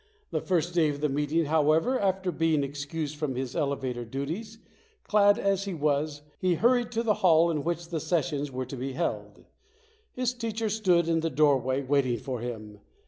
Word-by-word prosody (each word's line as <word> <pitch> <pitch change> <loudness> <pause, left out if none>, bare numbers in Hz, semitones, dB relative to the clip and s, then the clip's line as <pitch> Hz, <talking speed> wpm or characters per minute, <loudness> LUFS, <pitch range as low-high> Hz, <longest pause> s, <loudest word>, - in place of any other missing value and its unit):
The - - -1
first 175 -2 0
day 165 -3 +3
of 145 -1 -4
the 150 0 0
meeting, 150 +4 0
however, 160 - +2
after 190 -2 0
being 160 -3 +1
excused 145 +2 -4
from 150 -4 -2
his 130 -1 -4
elevator 135 -5 -2
duties, 160 - -5 0.5
clad 205 -1 +4
as 195 0 0
he 195 -3 -4
was, 145 0 -1 0.2
he 185 -2 +2
hurried 240 +5 +2
to 230 0 0
the 220 -2 +3
hall 170 -2 +5
in 150 -3 -2
which 170 0 -3
the 165 -2 -2
ses 165 0 0
sions 145 -4 -3
were 130 0 -3
to 130 - -7
be 130 +1 -4
held. 170 +4 -4 0.7
His 250 -1 -1
teacher 225 -2 -3
stood 185 -6 +2
in 165 -1 +2
the 165 0 -1
doorway 135 -2 +2
waiting 130 -3 +1
for 125 +2 -5
him. 110 -3 -7
155 Hz, 190 wpm, -28 LUFS, 140-185 Hz, 0.7 s, hall